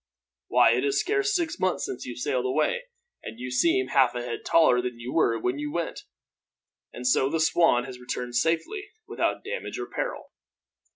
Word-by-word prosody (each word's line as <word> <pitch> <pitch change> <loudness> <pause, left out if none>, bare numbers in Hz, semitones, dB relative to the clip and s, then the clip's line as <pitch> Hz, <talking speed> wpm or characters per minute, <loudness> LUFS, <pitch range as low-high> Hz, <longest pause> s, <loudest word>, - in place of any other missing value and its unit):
Why, - - +5
it - - +1
is 410 -1 +1
scarce 405 +1 +1
six 340 -3 -1
months 185 -1 0
since 125 - -6
you 120 - -5
sailed 125 +1 -1
away, 485 - 0 0.4
and 110 - -8
you 125 0 -5
seem 130 0 +2
half 130 -2 +3
a 120 - -3
head 120 -1 -4
taller 140 -7 +4
than 125 -1 -5
you 120 +2 -6
were 115 -8 +3
when 125 +5 -1
you 150 0 -3
went! 170 +1 -4 0.9
And 125 - -8
so 130 +1 +3
the 165 - -1
Swan 160 -5 +3
has 125 0 -9
returned 125 0 -5
safely, 165 - 0 0.2
without - - -1
damage 470 +5 -5
or - - -4
peril?" - - -5
130 Hz, 185 wpm, -26 LUFS, 125-185 Hz, 0.9 s, Why